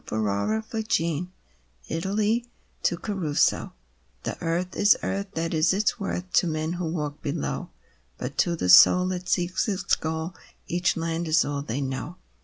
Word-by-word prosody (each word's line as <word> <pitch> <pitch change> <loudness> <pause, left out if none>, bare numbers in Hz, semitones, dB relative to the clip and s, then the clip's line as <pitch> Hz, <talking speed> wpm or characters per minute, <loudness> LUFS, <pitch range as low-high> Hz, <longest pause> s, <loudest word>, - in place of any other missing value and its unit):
r 110 - -2
i09i 110 - -1
DAY 225 - -1
DREAMS 170 -5 0 0.6
ITALY 210 +7 0 0.4
(To 175 - +1
Caruso) 175 -7 0 0.5
The - - -3
earth 175 +2 -1
is 205 - +5
earth 200 +1 -2
— - - -35
that 165 +1 -1
is 160 +2 +3
its 205 +3 +1
worth, 180 -2 -4
To 180 - +4
men 155 +1 -2
who 175 -1 -3
walk 150 -3 -4
below. 70 - -3 0.5
But - - -5
to 170 - +3
the 90 - -2
soul 180 - +8
that 180 -1 -4
seeks 180 +4 +1
its 195 -3 +1
goal, 160 +2 -3 0.3
Each 175 0 0
land 165 +1 -2
is 160 +1 +4
all 145 -1 -2
they 140 0 -3
know. 135 +5 -4
170 Hz, 170 wpm, -26 LUFS, 155-185 Hz, 0.6 s, soul